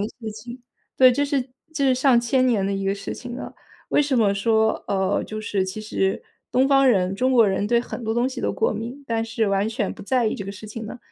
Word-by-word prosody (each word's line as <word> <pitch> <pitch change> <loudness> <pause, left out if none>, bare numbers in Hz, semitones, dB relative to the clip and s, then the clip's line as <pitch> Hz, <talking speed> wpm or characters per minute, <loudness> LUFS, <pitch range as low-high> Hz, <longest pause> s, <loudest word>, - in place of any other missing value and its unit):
的 205 - -1
事 220 -2 -5
情， 240 +3 -10 0.3
对， 255 -1 +7
这 285 +3 +1
是 280 -2 0 0.3
这 280 - 0
是 260 - +4
上 255 -2 +4
千 255 +2 +2
年 220 -6 +2
的 200 - -1
一 195 0 -2
个 195 0 +1
事 200 0 -6
情 245 -1 -8
了。 - - -8 0.3
为 - - +3
什 275 -3 +1
么 210 -3 +3
说 220 +2 +1
呃， 190 0 0
就 215 0 -6
是 200 -3 -1
其 190 +3 -5
实 195 -2 -1 0.3
东 260 +2 +3
方 275 -1 +5
人 190 -5 +2
中 255 +6 +1
国 235 -4 +6
人 195 +1 0
对 235 +2 +3
很 245 - -7
多 220 0 -1
东 240 +2 +1
西 265 - -6
都 - - -1
过 455 - 0
敏， 245 +6 -6
但 225 -1 -1
是 225 -1 -1
完 200 +2 +1
全 210 -3 -2
不 - - -11
在 245 +2 +1
意 215 - 0
这 200 - -6
个 195 - -6
事 205 +2 -10
情 215 +1 -7
呢？ 245 - -8
225 Hz, 280 characters per minute, -23 LUFS, 200-255 Hz, 0.3 s, 对